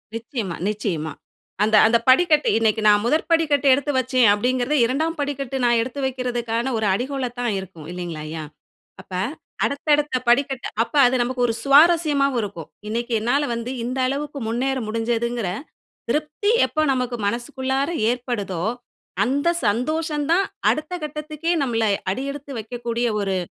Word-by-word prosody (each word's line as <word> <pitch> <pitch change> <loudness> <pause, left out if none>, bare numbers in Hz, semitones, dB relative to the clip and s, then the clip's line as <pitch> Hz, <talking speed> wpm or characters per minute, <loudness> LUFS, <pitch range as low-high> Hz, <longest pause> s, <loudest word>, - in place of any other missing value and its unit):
நிச்சயமா, 230 - -4
நிச்சயமா. 175 -7 -3 0.5
அந்த 215 0 +3
அந்த 235 +1 +4
படிக்கட்டு 305 +2 +5
"இன்னைக்கு, 220 -1 +1
நான் 205 0 +5
முதற் 310 +6 +1
படிக்கட்டு 295 -4 +3
எடுத்து 285 +2 0
வைச்சேன்." 255 -2 +3
அப்படிங்கிறதே 255 +6 0
2ம் 315 +6 -1
படிக்கட்டு 275 -2 -3
நான் 240 -1 +4
எடுத்து 260 +4 -5
வைக்கிறதுக்கான 245 -1 -2
ஒரு 220 - -1
அடிகோலா 255 +3 -2
தான் 240 -4 0
இருக்கும். 170 -5 -10
இல்லைங்களாய்யா? 160 -3 -5 0.6
அப்ப 190 - -15 0.5
அடுத்த 280 +2 -4
அடுத்த 295 -3 -1
படிக்கட்டு 270 +1 +2 0.2
அப்ப 265 - -11
அது 250 +1 +3
நமக்கு 250 0 -1
ஒரு 225 - 0
சுவாரஸ்யமாவும் 285 -3 +4
இருக்கும். 190 -6 -7 0.2
இன்னைக்கு 235 +2 -2
என்னால 275 +6 +1
வந்து 235 +2 -4
இந்த 255 +2 -3
அளவுக்கு 285 +1 -3
முன்னேற 260 +4 0
முடிஞ்சதுங்கிற 230 -1 -1 0.6
திருப்தி 305 +8 0
எப்போ 310 - -1
நமக்கு 250 -1 -2
மனசுக்குள்ளாற 265 +5 -2 0.2
ஏற்படுதோ, 220 -8 -3 0.6
அந்த 285 +8 +1 0.2
சந்தோஷம் 295 - 0
தான் 385 +3 +4 0.2
அடுத்த 310 +4 -1
கட்டத்துக்கே 305 +2 -3
நம்மளை 225 -4 +1 0.2
அடியெடுத்து 275 +4 -5
வைக்கக்கூடிய 235 +1 -3
ஒரு 195 -1 -1
250 Hz, 135 wpm, -22 LUFS, 225-285 Hz, 0.6 s, படிக்கட்டு